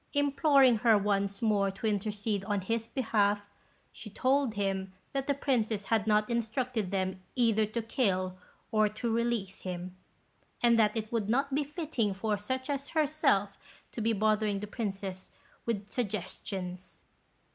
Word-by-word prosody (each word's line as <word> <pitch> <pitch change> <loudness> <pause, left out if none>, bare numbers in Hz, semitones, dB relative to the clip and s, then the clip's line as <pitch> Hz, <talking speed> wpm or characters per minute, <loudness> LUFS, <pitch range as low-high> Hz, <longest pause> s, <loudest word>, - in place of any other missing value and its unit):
Imploring 280 -3 +4
her 225 -1 +5
once 200 0 0
more 205 -3 +3
to 195 +3 -7
intercede 205 -1 -1
on 205 -1 0
his 225 +4 -2
behalf, 205 -5 +1 0.4
she 220 - -10
told 260 +2 +1
him 195 -1 -1 0.2
that 275 -1 -2
the 285 - +3
Princess 225 -7 0
had 220 0 +1
not 210 0 +3
instructed 235 -2 -1
them 185 -1 -2
either 225 -4 +3
to 225 +2 -3
kill 185 -6 0 0.4
or 215 -1 +3
to 225 +2 -2
release 230 -5 -1
him, 180 0 -5 0.7
and 235 -1 +5
that 215 0 +3
it 220 0 -3
would 220 -3 -1
not 275 +4 +1
be 290 +2 +2
fitting 285 - -2
for 210 +2 0
such 260 +6 -3
as 280 -1 -3
herself 280 -10 +2 0.3
to 230 - -5
be 225 +1 +2
bothering 215 -1 +1
the 210 - -4
Princess 195 -3 -5 0.3
with 205 -3 -1
suggestions. 190 -4 -4
215 Hz, 150 wpm, -30 LUFS, 200-240 Hz, 0.7 s, her